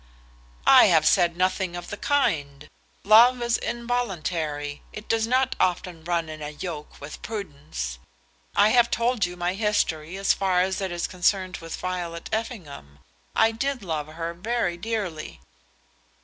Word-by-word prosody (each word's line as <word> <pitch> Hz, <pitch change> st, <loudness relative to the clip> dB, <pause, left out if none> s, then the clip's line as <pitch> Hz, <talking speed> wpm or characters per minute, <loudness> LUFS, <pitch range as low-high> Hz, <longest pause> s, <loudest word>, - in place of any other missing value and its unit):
"I -, -, +8 dB
have -, -, +4 dB
said 170 Hz, -1 st, +3 dB
nothing 185 Hz, -1 st, 0 dB
of 175 Hz, 0 st, -7 dB
the -, -, -3 dB
kind. 150 Hz, -, 0 dB, 0.4 s
Love 235 Hz, +5 st, +7 dB
is 235 Hz, 0 st, +1 dB
involuntary. 175 Hz, -12 st, -3 dB
It 210 Hz, -, -9 dB
does 225 Hz, 0 st, +1 dB
not 255 Hz, +1 st, +2 dB
often 175 Hz, -2 st, 0 dB
run 170 Hz, -1 st, -1 dB
in 155 Hz, 0 st, -8 dB
a 150 Hz, -, -4 dB
yoke 150 Hz, 0 st, -7 dB
with 145 Hz, +2 st, -9 dB
prudence. 140 Hz, -, -5 dB, 0.6 s
I 210 Hz, -, +5 dB
have 240 Hz, +1 st, +4 dB
told 235 Hz, -4 st, +1 dB
you 180 Hz, 0 st, -9 dB
my 175 Hz, +1 st, -1 dB
history 190 Hz, -5 st, -1 dB
as 195 Hz, 0 st, +3 dB
far 185 Hz, -2 st, +1 dB
as 190 Hz, +1 st, -1 dB
it 190 Hz, -2 st, -2 dB
is 175 Hz, 0 st, -2 dB
concerned 185 Hz, 0 st, 0 dB
with 165 Hz, 0 st, -7 dB
Violet 175 Hz, -2 st, -4 dB
Effingham. 170 Hz, -, -5 dB, 0.4 s
I 225 Hz, 0 st, +4 dB
did 260 Hz, +1 st, -2 dB
love 155 Hz, -4 st, -3 dB
her 165 Hz, +2 st, -5 dB
very 195 Hz, 0 st, -1 dB
dearly." 180 Hz, -, -4 dB
180 Hz, 150 wpm, -25 LUFS, 160-220 Hz, 0.6 s, I